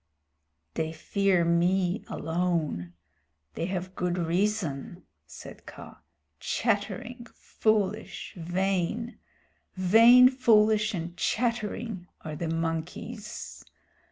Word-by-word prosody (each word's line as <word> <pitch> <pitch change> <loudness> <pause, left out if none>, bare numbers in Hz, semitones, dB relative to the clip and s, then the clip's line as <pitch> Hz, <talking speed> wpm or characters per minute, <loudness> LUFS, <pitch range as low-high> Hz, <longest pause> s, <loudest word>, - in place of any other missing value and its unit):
"They 160 0 -2
fear 185 +2 +1
me 175 +3 +1
alone. 160 - -2 0.6
They 165 - -3
have 185 0 -4
good 180 -1 -2
reason," 175 -3 -1 0.2
said 75 - -12
Kaa. - - -11 0.4
"Chattering, 225 +2 -2
foolish, 215 -1 -1
vain 190 +6 -2 0.6
vain, 230 +7 +7
foolish, 215 -4 +3
and 170 0 -5
chattering, 215 -3 -2
are 155 -2 -6
the 165 +2 -3
monkeys. 165 +7 -4
185 Hz, 85 wpm, -28 LUFS, 170-215 Hz, 0.6 s, vain